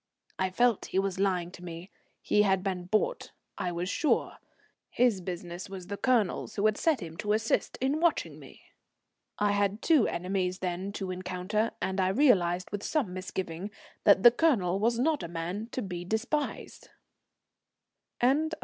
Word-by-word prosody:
I 190 0 +1
felt 240 +3 +2
he - - -3
was 195 -1 0
lying 180 -3 0
to 180 - -12
me. 170 +2 -8 0.3
He 210 - +3
had 190 -2 +2
been 185 -2 -2
bought, 215 - -1 0.3
I 180 - -1
was 175 +1 -3
sure. 295 +9 0 0.5
His 235 -6 +2
business 175 0 -6
was 190 -2 -7
the 200 +3 -4
Colonel's, 230 -4 +1
who 205 - 0
had 215 -1 +4
set 310 -3 +1
him 165 -1 -8
to 210 +2 0
assist 220 +1 0
in 270 +4 0
watching 340 -1 0
me. - - -15 0.7
I 205 0 +2
had 205 +1 0
two 310 -9 +4
enemies 180 +1 -1
then 185 +1 -3
to 190 -3 -4
encounter, 185 +4 -2
and 190 0 0
I 185 - +2
realized 185 -6 +3
with 205 0 -3
some 250 - -1
misgiving 185 0 -4 0.3
that 200 -2 +5
the 240 - +10
Colonel 220 - +2
was 230 +3 +2
not 295 +4 +1
a - - -4
man 175 +6 -4
to 255 - -2
be 180 -3 -5
despised. 235 - -3 1.3
CHAPTER 275 +6 +3
IX. 320 - -5
195 Hz, 170 wpm, -29 LUFS, 180-230 Hz, 1.3 s, the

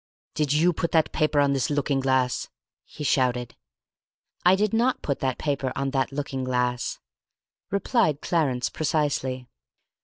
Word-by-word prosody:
"Did 150 -2 0
you 165 +4 +3
put 165 +1 -2
that 160 -2 +3
paper 155 -2 +1
on 140 -1 +3
this 135 +4 0
looking 145 -1 0
glass?" 130 -2 +1 0.4
he 150 - -9
shouted. 125 -4 +1 0.9
"I 180 +2 +6
did 210 +2 0
not 240 +3 +1
put 140 - -1
that 130 -2 -1
paper 140 -3 -1
on 135 0 -1
that 135 -1 0
looking 135 -2 -3
glass," 125 -1 -1 0.7
replied 200 - +1
Clarence 135 -9 0
precisely. 140 -5 -1
140 Hz, 145 wpm, -25 LUFS, 130-155 Hz, 0.9 s, I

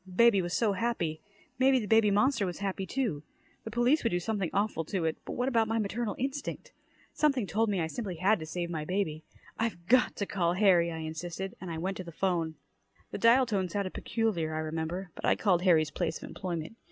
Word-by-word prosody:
Baby 230 -2 +6
was 175 0 -2
so 220 -4 +2
happy. 185 -7 -1 0.4
Maybe 265 0 +5
the 230 - -1
baby 220 0 +4
monster 230 +3 +3
was 175 - -4
happy, 195 -1 -3
too. 230 - -1 0.4
The - - -4
police 240 +7 +2
would 230 - +2
do 175 - 0
something 195 -2 -2
awful 200 -5 0
to 180 0 -2
it. 160 - 0
But - - -5
what 250 +1 -1
about 230 -4 +2
my 225 +1 0
maternal 220 0 -2
instinct? 285 - -4 0.4
Something 275 -7 +2
told 215 +5 +1
me 200 -3 0
I 165 - +1
simply 190 +2 -4
had 190 +5 +2
to 155 - -7
save 170 +1 -3
my 155 -2 -3
baby! 160 -3 -2 0.3
"I've 220 -7 -2
got 250 +6 +4
to 200 - -2
call 175 -4 0
Harry," 180 -3 +4
I 165 - -5
insisted, 165 +4 -5
and 185 - -6
I 165 - -4
went 190 +4 -2
to 185 - -5
the 170 - -9
'phone. 165 -2 -1 0.6
The - - -4
dial 240 +3 +6
tone 195 -6 -1
sounded 195 +1 -2
peculiar, 175 -9 -1
I - - -1
remember, 160 +4 -4
but - - -11
I - - +4
called 185 -5 +2
Harry's 160 -5 +4
place 170 -2 -2
of - - -9
employment. 175 +2 -5
195 Hz, 220 wpm, -30 LUFS, 170-225 Hz, 0.6 s, Baby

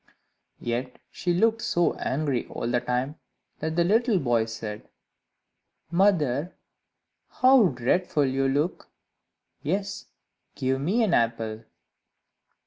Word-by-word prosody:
Yet 120 +2 -3
she 175 - -2
looked 225 +6 +2
so 175 -4 +1
angry 140 -2 -2
all - - -5
the 120 0 +1
time, 125 +5 -2 0.4
that 160 +1 -3
the 170 - +3
little 225 +4 +3
boy 120 -7 +1
said, 110 -2 -7 1.0
"Mother, 170 -5 +2 0.7
how 255 -4 +5
dreadful 145 +4 +1
you 135 0 +1
look! 145 +6 -1 0.7
Yes, 195 +6 -3 0.5
give 130 0 -1
me 200 +11 +2
an 200 -6 +1
apple." 115 -1 0
145 Hz, 110 wpm, -26 LUFS, 125-185 Hz, 1.0 s, how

